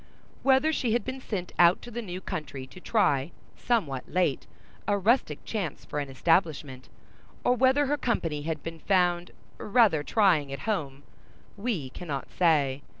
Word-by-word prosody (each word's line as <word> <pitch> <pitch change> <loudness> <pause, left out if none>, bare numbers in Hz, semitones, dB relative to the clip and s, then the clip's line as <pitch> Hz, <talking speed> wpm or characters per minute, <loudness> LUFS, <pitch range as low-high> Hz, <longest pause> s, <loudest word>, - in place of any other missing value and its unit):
Whether 275 +4 +4
she 240 -7 0
had 240 - 0
been 260 0 -5
sent 190 -8 -4
out 175 +1 +6
to 240 - -9
the 240 +1 -4
new 185 -4 -6
country 140 -6 -5
to 130 - -13
try, 175 - +1 0.3
somewhat 155 - -1
late, 175 -6 0 0.4
a 205 - +2
rustic 200 - +1
chance 195 -9 -4
for 150 - -4
an 140 -1 -4
establishment, 145 -3 0 0.5
or 245 - +4
whether 260 +3 +3
her 295 +2 0
company 165 - -1
had 155 0 -4
been 165 0 -6
found 175 -1 +1 0.3
rather 210 -8 +3
trying 165 -6 +2
at 140 - -5
home, 145 -11 -3 0.5
we 200 - -3
cannot 150 -5 -6
say. 145 -6 +2
175 Hz, 155 wpm, -28 LUFS, 145-225 Hz, 0.5 s, out